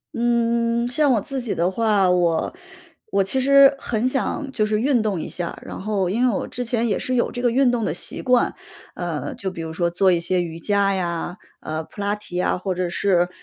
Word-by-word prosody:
嗯， 235 0 +1
像 290 0 +3
我 215 - +1
自 270 +5 -4
己 235 -4 -2
的 175 +3 +1
话， 205 -3 +2
我 170 -2 +1 0.6
我 195 - +4
其 195 +8 -1
实 275 +1 +6
很 235 -1 -1
想 270 +1 -2
就 215 -5 0
是 215 0 0
运 260 -3 +2
动 200 -6 -1
一 - - -6
下， 175 -1 -4
然 - - -7
后 195 -3 -1
因 245 +6 +2
为 205 - 0
我 - - -3
之 245 0 -4
前 235 -1 0
也 205 - 0
是 255 - -2
有 240 - +1
这 245 - -5
个 245 - +3
运 250 +1 +3
动 235 -3 -1
的 - - -1
习 - - -3
惯， 250 -1 +2 0.4
呃， 155 -6 -4
就 195 - -4
比 180 -3 -7
如 160 0 -5
说 170 +1 0
做 185 +2 +3
一 175 - +2
些 180 +1 0
瑜 165 -1 -5
伽 200 +1 +1
呀， 175 0 -3 0.2
呃， 155 +1 -4
普 205 - -10
拉 200 0 0
提 210 -4 -7
啊， - - +1
或 185 0 -3
者 180 0 -1
是， 175 -1 +1
205 Hz, 245 characters per minute, -22 LUFS, 180-240 Hz, 0.6 s, 实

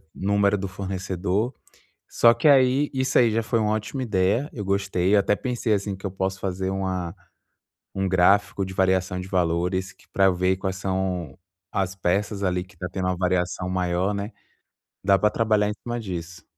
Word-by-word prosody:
número 100 +1 +2
do 95 0 -3
fornecedor. 95 +3 -2 0.6
Só 120 0 +6
que 120 +6 +2
aí, 135 +1 +4
isso 130 -1 +1
aí 115 -2 +4
já 115 +1 +1
foi 115 +1 0
uma 105 0 +1
ótima 110 +5 -3
ideia, 105 - +1
eu 105 -4 -5
gostei, 100 0 +1
eu 100 - +6
até 105 +1 +1
pensei 120 -3 -2
assim 100 -1 0
que 95 - -19
eu 95 - -1
posso 95 0 -3
fazer 95 0 -2
uma 95 -3 -3 0.8
um 95 -1 0
gráfico 95 +2 +3
de 95 - -7
variação 95 -1 +1
de 90 - -8
valores 90 +1 0
que - - -25
para 95 - +3
eu 95 - +5
ver 90 +1 +1
quais 95 0 -3
são 95 -6 -2 0.3
as 95 -2 -1
peças 100 +2 -1
ali 90 -1 0
que 90 - -19
está 90 +2 -5
tendo 95 -1 -3
uma 90 - 0
variação 90 0 -1
maior, 90 +2 0
né. 100 +3 -4 0.7
Dá 100 -1 +5
para 105 - +3
trabalhar 110 -2 +2
em - - -1
cima 120 0 -3
disso. 85 -4 -6
95 Hz, 190 wpm, -24 LUFS, 90-105 Hz, 0.8 s, Só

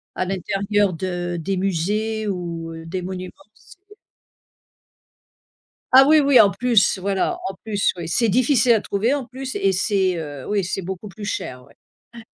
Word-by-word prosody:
à - - -1
l'intérieur 195 +1 0
de 175 0 -3
des 190 +4 -2
musées 210 +4 -1
ou, 170 -3 -4
heu, 165 0 -9
des 180 +2 -4
monuments. 185 0 -6 0.2
C'est - - -19 2.2
Ah 265 +1 +9
oui, 310 0 +6
oui, 275 -4 +6
en 200 -2 +6
plus, 235 -5 +2
voilà, 195 0 -1
en 195 - -6
plus, 205 -2 0
oui, 165 -2 -6
c'est 230 +6 +1
difficile 245 +2 +3
à 220 - +3
trouver 220 +8 0
en 275 -3 -3
plus 260 +1 -7
et 195 -1 +1
c'est, 190 -1 +1
heu, 145 -4 -7
oui 205 -3 0
c'est 190 +1 -3
beaucoup 190 +3 -6
plus 205 +2 -10
cher, 125 -10 -4
ouais. 140 - -22 0.4
Ouais. 235 -1 -11
195 Hz, 170 wpm, -21 LUFS, 180-220 Hz, 2.2 s, Ah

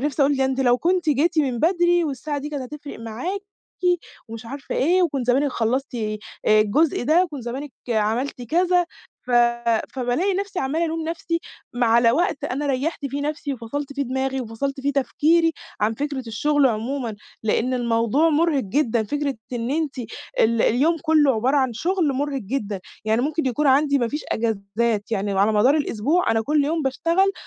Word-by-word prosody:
نفسي 290 +1 0
أقول 280 +1 +3
"ده 265 - +2
أنتِ 265 0 0
لو 245 -1 +3
كنتِ 355 -1 +1
جيتِ 310 +4 +2
من 265 -5 +1
بدري 350 0 +3
والساعة 290 0 -3
دي 285 +1 -5
كانت 290 -3 -4
هتفرق 295 -1 -9
معاكِ 250 - -4 0.9
ومش 230 0 -8
عارفة 275 +3 -6
إيه، 360 +6 +3
وكنت 280 -7 -1
زمانِك 270 +4 +3
خلّصتِ 250 +4 -1
آآ، 215 -2 -2 0.4
الجزء 260 +8 +2
ده 325 +7 +4
وكنتِ 295 -7 -7
زمانِك 265 +4 -5 0.2
عملتِ 230 +5 0
كذا" 355 +7 +2 0.4
ف - - -1 0.6
فبالاقي 265 +10 0
نفسي 395 0 -3
عمّالة 310 +6 0
ألوم 325 0 -2
نفسي، 335 0 -2 0.3
ما 245 0 +1
على 230 +1 +5
وقت 345 0 0
أنا 285 +3 -2
ريّحت 280 +2 -1
فيه 280 +2 -4
نفسي، 295 -1 -3
وفصلت 270 +4 -5
فيه 280 0 -2
دماغي، 265 +1 -2
وفصلت 270 +4 -4
فيه 285 +1 0
تفكيري 325 +4 +2 0.3
عن 210 +2 +2
فكرة 280 0 -3
الشغل 290 +5 +2
عمومًا، 235 0 -2 0.3
لأن 230 +4 +1
الموضوع 235 +5 +2
مرهق 310 -3 +2
جدًا 235 +1 +1
فكرة 290 +3 -2 0.2
إن 235 0 -2
أنتِ 295 -2 -1 0.4
ال 230 0 +3
اليوم 300 +8 +3
كُلّه 305 -5 +4
عبارة 255 +6 +1
عن 260 -3 +2
شغل 335 - 0
مرهق 275 0 -2
جدًا، 205 -3 -3 0.2
يعني 220 +2 +2
ممكن 310 +1 -1
يكون 260 +4 0
عندي 280 +1 +4
ما 240 -3 0
فيش 295 +5 -3
أجازات 220 0 -1
يعني 200 -1 -1
على 200 +3 +3
مدار 245 +8 +4
الأسبوع 295 +4 +1
أنا 225 - +2
كُلّ 295 +5 +2
يوم 320 +2 0
باشتغل 335 +8 +1
275 Hz, 175 wpm, -23 LUFS, 235-310 Hz, 0.9 s, على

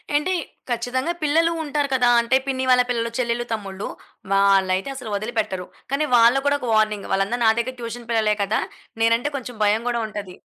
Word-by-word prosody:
ఏంటి 335 +6 +1 0.4
ఖచ్చితంగా 250 +6 -1
పిల్లలు 325 +3 +3
ఉంటారు 290 -1 -1
కదా, 245 -2 +3
అంటే 250 +3 +3
పిన్ని 260 -1 -1
వాళ్ళ 250 0 +6
పిల్లలు, 235 -1 0
చెల్లెళ్ళు, 240 -1 -1
తమ్ముళ్ళు, 195 -2 -5 0.5
వాళ్ళైతే 195 +1 +3
అసలు 250 -5 -7
వదిలిపెట్టరు. 205 -3 -2 0.3
కానీ 295 +2 +1
వాళ్ళ 235 +2 +6
కూడా 285 0 +3
ఒక 250 - -5
వార్నింగ్, 215 -2 +1
వాళ్ళందరూ 195 +5 0
నా - - +7
దగ్గర 255 +2 -3
ట్యూషన్ 235 0 -7
పిల్లలే 215 -2 +2
కదా! 210 +3 0 0.4
నేనంటే 230 +5 +2
కొంచెం 245 -3 -8
భయం 210 +2 +3
గూడా 235 -1 -1
ఉంటది. 200 -4 -7
235 Hz, 170 wpm, -22 LUFS, 210-260 Hz, 0.5 s, నా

